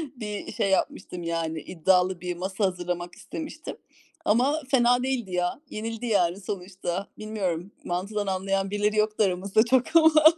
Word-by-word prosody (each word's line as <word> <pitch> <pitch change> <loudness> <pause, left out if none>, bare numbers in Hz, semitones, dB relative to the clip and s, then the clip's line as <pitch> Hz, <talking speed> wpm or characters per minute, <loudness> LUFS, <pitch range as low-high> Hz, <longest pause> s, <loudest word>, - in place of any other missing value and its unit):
bir 210 -4 -5
şey 205 -2 0
yapmıştım. 180 -2 -1
Yani 165 -1 -2
iddialı 180 +1 +2
bir 180 -1 -3
masa 190 +3 -1
hazırlamak 175 -1 -3
istemiştim. 310 -2 -7 0.5
Ama 260 +9 +3
fena 245 -1 +4
değildi 255 -7 -1
ya, 180 +8 -1
yenildi 225 +2 -4
yani 195 -4 +2
sonuçta. 190 0 -4
Bilmiyorum 195 -4 -3
mantıdan 200 +4 -2
anlayan 195 +1 0
birileri 210 +1 +1
yoktu 215 0 +2
aramızda 195 +2 +2
çok 260 +5 +2
ama. 315 -1 +7
195 Hz, 140 wpm, -26 LUFS, 180-220 Hz, 0.5 s, ama